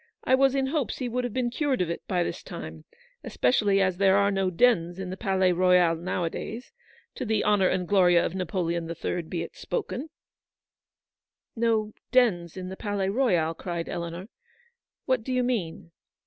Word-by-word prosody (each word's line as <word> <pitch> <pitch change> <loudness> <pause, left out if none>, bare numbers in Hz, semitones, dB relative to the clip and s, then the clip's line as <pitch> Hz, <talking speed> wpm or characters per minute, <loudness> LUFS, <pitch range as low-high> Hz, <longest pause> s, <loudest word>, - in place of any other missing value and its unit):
I - - +1
"was 270 0 +4
in 270 -1 +1
hopes 280 -1 -2
he 255 - -3
would 250 +1 -2
have 245 - -3
been 245 -2 -1
cured 280 0 0
of 175 -2 0
it 170 - -4
by 180 -2 +1
this - - -4
time; - - -9 0.4
especially 205 -6 +2
as 185 -2 0
there 195 0 +4
are 200 0 +3
no 195 -1 +1
dens 175 -3 +2
in 190 -1 -5
the - - -4
Palais 190 -3 +1
Royal 180 -1 +4
now 175 +2 -3
a 165 - 0
days; 235 +3 -7 0.4
to - - -5
the 220 -3 0
honour 205 -3 +3
and 180 -1 -1
glory 180 -3 +4
of 170 0 +2
Napoleon 170 -2 -2
the 170 - -5
Third 170 0 -4
be 170 -2 -2
it - - -9
spoken/' 320 - -4 0.8
" - - -66
No 215 -2 +1 0.2
dens 190 -10 +2
in 185 0 -5
the 190 - -6
Palais 205 -3 -2
Royal," 185 -9 +1
cried 170 0 -5
Eleanor. 170 +2 -5 0.4
" 475 0 -48
What 260 -4 +1
do 260 - -5
you 255 0 +1
mean 185 -9 -3
190 Hz, 195 wpm, -26 LUFS, 175-245 Hz, 0.8 s, was